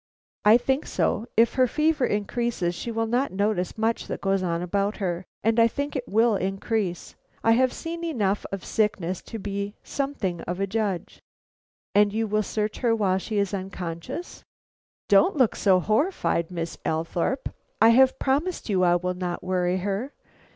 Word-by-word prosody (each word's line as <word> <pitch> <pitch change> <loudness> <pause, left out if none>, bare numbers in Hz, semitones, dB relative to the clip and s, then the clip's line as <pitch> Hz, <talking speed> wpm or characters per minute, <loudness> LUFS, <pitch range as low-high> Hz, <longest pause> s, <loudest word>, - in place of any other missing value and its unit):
"I 215 +2 +7
think 265 +4 -1
so; 225 - 0
if 230 +1 +5
her 255 -1 +3
fever 300 -1 +1
increases 205 -3 -1
she 205 - -5
will 225 0 -1
not 245 +5 0
notice 200 -1 -1
much 225 +1 0
that - - -4
goes 195 -1 +1
on 170 -1 -1
about 200 +3 -1
her, 180 -2 -3 0.2
and 225 +2 +3
I 230 - +7
think 285 +5 -4
it 255 -2 -3
will 225 +2 +3
increase; 195 -1 -2 0.3
I 225 - +4
have 255 +2 +4
seen 335 +4 -6
enough 210 - 0
of 195 -2 -5
sickness 195 -5 0
to 225 - -8
be 200 0 -4
something 225 -12 -3
of 180 +1 -3
a 195 - +1
judge." 200 -3 -3 0.7
"And 205 0 +5
you 225 +2 0
will 215 0 +1
search 210 +1 -2
her 235 -3 +2
while 190 -4 +1
she 215 +2 -4
is 200 0 0
unconscious?" 185 - -6 0.6
"Don't 205 - +4
look 255 -5 +3
so 190 -3 +4
horrified, 215 - 0
Miss 170 -2 -5
Althorpe. 165 - -1 0.3
I 225 - +7
have 260 +3 +5
promised 285 +3 -1
you 190 -3 +2
I 175 -1 +4
will 180 +1 -1
not 180 -1 -4
worry 180 -1 0
her. 205 +8 -2
210 Hz, 170 wpm, -25 LUFS, 185-235 Hz, 0.7 s, I